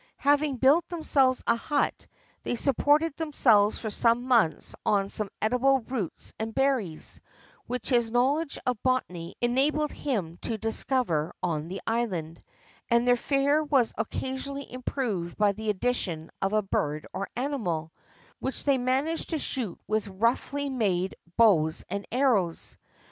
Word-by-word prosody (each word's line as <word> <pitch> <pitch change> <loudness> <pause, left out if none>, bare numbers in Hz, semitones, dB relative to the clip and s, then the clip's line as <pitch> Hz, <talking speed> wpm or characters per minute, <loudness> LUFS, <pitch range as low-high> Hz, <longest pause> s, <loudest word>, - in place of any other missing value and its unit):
Having 285 -1 +3
built 290 +7 +4
themselves 275 -7 +2
a - - +3
hut, 285 +5 -1 0.3
they - - -2
supported 290 +4 +2
themselves 235 -10 +3
for 220 - -4
some 235 +3 +2
months 230 -11 +2
on 200 -1 +1
some 210 -1 -2
edible 255 +4 +3
roots 225 -7 -5
and 220 0 -4
berries, 260 - +1 0.5
which 250 0 -4
his 240 -3 +3
knowledge 275 +6 +1
of 250 -4 -1
botany 180 -10 -1
enabled 285 +5 +2
him 190 - -3
to 225 +3 -3
discover 225 - 0
on 160 -3 -1
the 190 +2 -6
island, 185 -9 -2 0.5
and 235 0 +3
their 245 - +6
fare 280 +4 +2
was 275 -6 +2
occasionally 265 +5 -4
improved 235 -9 -3
by 210 -1 +4
the 215 +2 -4
addition 190 -7 -1
of 195 - +1
a 215 0 +2
bird 150 -5 -1
or 195 +2 -4
animal, 215 - -2 0.5
which 265 - -3
they 275 -2 +3
managed 270 +6 0
to 325 - 0
shoot 250 - -3
with 215 0 -1
roughly 235 +8 0
made 195 -8 0 0.2
bows 170 -9 +4
and 200 +1 -3
arrows. 225 -10 +1
240 Hz, 140 wpm, -27 LUFS, 200-270 Hz, 0.5 s, their